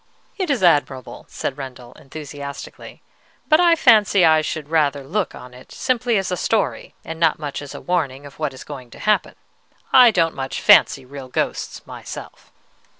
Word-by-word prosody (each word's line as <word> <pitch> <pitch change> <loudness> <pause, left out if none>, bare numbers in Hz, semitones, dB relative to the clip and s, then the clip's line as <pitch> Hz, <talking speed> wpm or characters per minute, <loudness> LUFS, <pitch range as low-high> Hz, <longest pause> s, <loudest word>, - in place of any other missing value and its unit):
"It 375 -4 -3
is 260 -9 0
admirable," 145 -6 +1
said 135 - -5
Rendel, 125 -3 -9
enthusiastically. 140 -1 -9 0.4
"But 310 0 +5
I 345 -1 +5
fancy 210 - +5
I 155 -1 +5
should 155 -1 -5
rather 145 -3 +1
look 185 +8 -2
on 125 0 -12
it 125 +1 -15
simply 245 -3 0
as 195 -1 -2
a 180 - -1
story, 220 +2 -1
and 160 0 -7
not 155 -4 0
as 145 - -9
a - - -8
warning 145 -6 -2
of 145 - -13
what 150 -3 -1
is 130 - -11
going 130 -4 -9
to - - -14
happen. 210 0 +1 0.6
I 250 -2 +9
don't 165 -6 +1
much 135 0 -4
fancy 135 - +5
real 135 0 -9
ghosts 125 - -3
myself." - - -10
155 Hz, 170 wpm, -21 LUFS, 135-205 Hz, 0.6 s, I